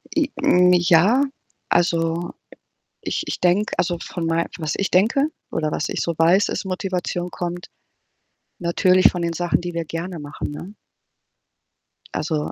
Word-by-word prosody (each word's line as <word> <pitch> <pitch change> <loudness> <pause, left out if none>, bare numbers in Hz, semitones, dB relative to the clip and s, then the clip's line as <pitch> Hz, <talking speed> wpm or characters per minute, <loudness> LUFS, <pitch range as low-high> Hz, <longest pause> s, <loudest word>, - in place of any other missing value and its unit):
I 300 -3 +2
n 180 0 +5
ja. 180 +9 +4 0.5
Also, 170 0 +1 0.7
ich - - -2
ich - - -3
denke 185 +4 +1
also 175 -1 0
von 170 -1 -5
mein 165 +1 0
was 155 -3 -2
ich 195 - -1
denke 225 +10 +3 0.2
oder 155 -1 -1
was - - -2
ich - - -2
so 170 - -1
weiß, 175 +5 +4
ist - - -3
Motivation 180 -2 -3
kommt 175 0 -5 0.9
natürlich 180 +2 +4
von 175 - -4
den 170 0 -1
Sachen, 175 0 0
die 175 0 -5
wir 170 -1 -3
gerne 165 +2 -5
machen, 145 0 -6
ne? 175 +7 -8 1.4
Also 155 -1 -2
175 Hz, 150 wpm, -22 LUFS, 165-185 Hz, 1.4 s, n